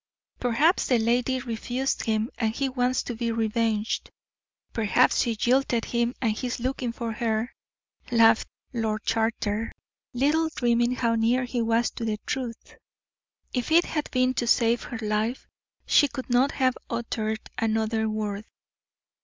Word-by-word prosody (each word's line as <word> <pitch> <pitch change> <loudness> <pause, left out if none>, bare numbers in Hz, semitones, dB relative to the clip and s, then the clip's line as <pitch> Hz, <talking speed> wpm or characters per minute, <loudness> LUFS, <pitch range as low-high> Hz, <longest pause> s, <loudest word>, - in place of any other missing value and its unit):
"Perhaps 275 +9 +2
the 250 - +4
lady 245 +3 +1
refused 245 +2 -2
him, 220 0 0
and 225 -1 0
he 275 - 0
wants 255 -1 0
to 245 - -4
be 230 0 -1
revenged. 225 -1 0 0.6
Perhaps 215 -4 +3
she 235 -1 0
jilted 245 +1 +1
him, 235 +1 0
and 230 -4 +1
he 235 +4 -3
is 245 - -3
looking 255 -1 -2
for 230 -1 -4
her," 225 +1 -1 0.6
laughed 225 -1 +5 0.3
Lord 220 -2 -1
Charter, 225 -1 -1 0.4
little 300 +6 +2
dreaming 240 0 +2
how 230 -2 +1
near 230 +3 +2
he 245 -1 -2
was 230 +1 +1
to - - -6
the 220 -2 -1
truth. 245 -4 -5 0.8
If 250 +3 -2
it 340 +2 +6
had 300 -2 -3
been 255 0 +2
to 240 -2 -1
save 235 0 +3
her 245 - -6
life, 215 +4 -1 0.4
she 290 - +5
could 260 -2 -7
not 255 +4 +3
have 255 -2 +2
uttered 220 -2 -3
another 220 0 0
word. 215 -1 -3
235 Hz, 150 wpm, -26 LUFS, 225-250 Hz, 0.8 s, it